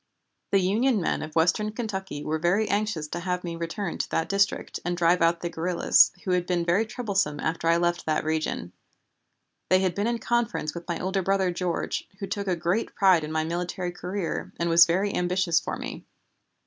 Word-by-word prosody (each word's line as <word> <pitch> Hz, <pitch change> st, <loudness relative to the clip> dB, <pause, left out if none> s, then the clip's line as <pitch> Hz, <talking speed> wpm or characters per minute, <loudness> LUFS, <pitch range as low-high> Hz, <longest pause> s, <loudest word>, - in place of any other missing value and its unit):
The 200 Hz, -, +3 dB
Union 220 Hz, +6 st, +2 dB
men 170 Hz, -, -1 dB
of 155 Hz, 0 st, -7 dB
western 180 Hz, +6 st, +2 dB
Kentucky 190 Hz, -9 st, -4 dB
were 155 Hz, +1 st, -1 dB
very 185 Hz, +6 st, +2 dB
anxious 205 Hz, -7 st, -1 dB
to 175 Hz, -, -4 dB
have 180 Hz, 0 st, -2 dB
me 170 Hz, -1 st, -4 dB
return 170 Hz, +3 st, -4 dB
to -, -, -2 dB
that 165 Hz, 0 st, -1 dB
district 200 Hz, 0 st, 0 dB
and 175 Hz, 0 st, -2 dB
drive 170 Hz, 0 st, +3 dB
out 170 Hz, 0 st, +3 dB
the 170 Hz, -, -2 dB
guerrillas, 170 Hz, +2 st, +4 dB
who 185 Hz, -, -2 dB
had 180 Hz, -1 st, +1 dB
been 175 Hz, -2 st, 0 dB
very 190 Hz, +6 st, +2 dB
troublesome 195 Hz, -, -1 dB
after 165 Hz, +1 st, -2 dB
I 165 Hz, -, +5 dB
had 170 Hz, +1 st, +1 dB
left 175 Hz, -1 st, 0 dB
that 155 Hz, -, +1 dB
region. 155 Hz, -, -2 dB, 1.0 s
They 185 Hz, 0 st, +5 dB
had 185 Hz, -2 st, +1 dB
been 205 Hz, +5 st, -1 dB
in 235 Hz, 0 st, 0 dB
conference 235 Hz, -10 st, -1 dB
with 170 Hz, 0 st, -8 dB
my 170 Hz, -, -2 dB
older 190 Hz, +1 st, -1 dB
brother 190 Hz, 0 st, +1 dB
George, 175 Hz, -1 st, -2 dB
who 200 Hz, -, -4 dB
took 200 Hz, 0 st, -4 dB
a 185 Hz, -, +1 dB
great 175 Hz, +6 st, -1 dB
pride 190 Hz, -5 st, +4 dB
in 150 Hz, -, -5 dB
my 160 Hz, 0 st, 0 dB
military 175 Hz, +2 st, -3 dB
career 180 Hz, +1 st, -4 dB
and 170 Hz, 0 st, 0 dB
was 165 Hz, 0 st, +8 dB
very 190 Hz, +4 st, 0 dB
ambitious 180 Hz, -1 st, +2 dB
for -, -, -4 dB
me. -, -, -7 dB
180 Hz, 205 wpm, -26 LUFS, 170-195 Hz, 1.0 s, was